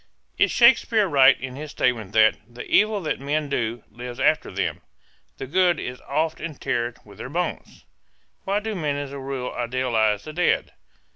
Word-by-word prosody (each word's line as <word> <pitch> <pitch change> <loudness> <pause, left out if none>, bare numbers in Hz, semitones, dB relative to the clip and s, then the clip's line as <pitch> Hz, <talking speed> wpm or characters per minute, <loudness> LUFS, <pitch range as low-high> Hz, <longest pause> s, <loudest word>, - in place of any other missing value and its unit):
Is - - +4
Shakespeare 235 -3 +5
right 140 -4 +5
in 130 0 -6
his 150 +2 -7
statement 120 -7 -1
that 110 0 +5 0.2
"The 120 +1 -8
evil 210 -1 +3
that 160 - -2
men 145 +2 -2
do 120 -3 -2
lives 120 +2 -8
after - - +2
them; - - -3 0.6
the - - -5
good 175 +3 +2
is 125 0 -6
oft 155 +3 -1
interred 135 -7 -3
with 100 -2 -16
their - - -6
bones"? 175 +4 -4 0.6
Why 200 +2 0
do 220 0 -4
men 150 -7 -2
as 145 -1 -5
a 140 - -6
rule 135 -2 -4
idealize 115 -4 0
the 155 - -8
dead? 175 +2 +1
140 Hz, 170 wpm, -23 LUFS, 120-165 Hz, 0.6 s, Shakespeare